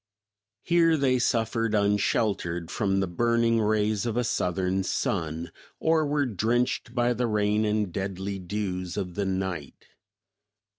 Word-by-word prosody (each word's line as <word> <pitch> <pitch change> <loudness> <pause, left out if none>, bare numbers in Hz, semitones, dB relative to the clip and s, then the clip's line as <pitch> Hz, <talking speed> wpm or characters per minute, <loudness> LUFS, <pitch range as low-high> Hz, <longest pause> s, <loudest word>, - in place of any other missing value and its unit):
Here 165 -2 +4
they 130 -3 +2
suffered 115 -1 +1
=unsheltered= 100 -4 0
from 95 -3 0
the 95 - 0
burning 115 +4 +2
rays 105 +1 +1
of 115 0 -2
a 125 - +2
southern 95 -3 0
sun, 85 -3 -2 0.3
or 160 -1 +2
were 145 0 +1
drenched 120 +2 -1
by 120 0 +2
the 120 +1 -1
rain 105 0 +1
and 105 -4 0
deadly 95 0 -3
dews 90 -1 -4
of 90 -3 -3
the 100 +2 -2
night. 95 -6 -4
105 Hz, 135 wpm, -27 LUFS, 95-115 Hz, 0.3 s, Here